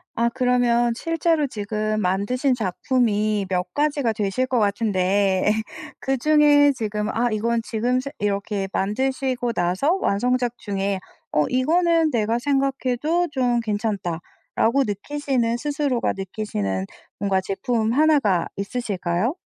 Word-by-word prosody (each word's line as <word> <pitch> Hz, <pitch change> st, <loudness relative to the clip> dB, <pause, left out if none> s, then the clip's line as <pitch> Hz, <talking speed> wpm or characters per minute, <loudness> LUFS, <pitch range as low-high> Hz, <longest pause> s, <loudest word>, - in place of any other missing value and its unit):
아 235 Hz, +1 st, +2 dB
그러면 245 Hz, -2 st, +2 dB
실제로 330 Hz, 0 st, 0 dB
지금 215 Hz, -1 st, -2 dB
만드신 210 Hz, +9 st, +1 dB
작품이 215 Hz, -1 st, 0 dB
몇 180 Hz, -1 st, -2 dB
가지가 290 Hz, -5 st, +1 dB
되실 210 Hz, +4 st, -1 dB
것 255 Hz, -2 st, 0 dB
같은데 200 Hz, -2 st, +1 dB
예. -, -, +5 dB, 0.5 s
그중에 290 Hz, +1 st, +4 dB
지금 210 Hz, -4 st, -3 dB
아 240 Hz, +2 st, 0 dB
이건 230 Hz, +2 st, 0 dB
지금 240 Hz, +3 st, 0 dB
최 275 Hz, +2 st, -5 dB
이렇게 200 Hz, -1 st, -1 dB
만드시고 255 Hz, +3 st, -1 dB
나서 185 Hz, -, +1 dB
완성작 245 Hz, +3 st, 0 dB
중에 195 Hz, -1 st, -2 dB, 0.3 s
어 150 Hz, -, +2 dB
'이거는 330 Hz, +4 st, +2 dB
내가 230 Hz, -1 st, 0 dB
생각해도 275 Hz, +4 st, 0 dB
좀 245 Hz, -4 st, +1 dB
괜찮다.'라고 210 Hz, +3 st, -1 dB
느끼시는 245 Hz, +2 st, -1 dB
스스로가 285 Hz, -1 st, -1 dB
느끼시는 105 Hz, -, -3 dB, 0.3 s
뭔가 195 Hz, -1 st, +1 dB
제품 220 Hz, +4 st, -1 dB
1 305 Hz, +2 st, +4 dB
가 190 Hz, -9 st, +1 dB
있으실까요? 200 Hz, -, -2 dB
235 Hz, 275 characters per minute, -23 LUFS, 200-265 Hz, 0.5 s, 예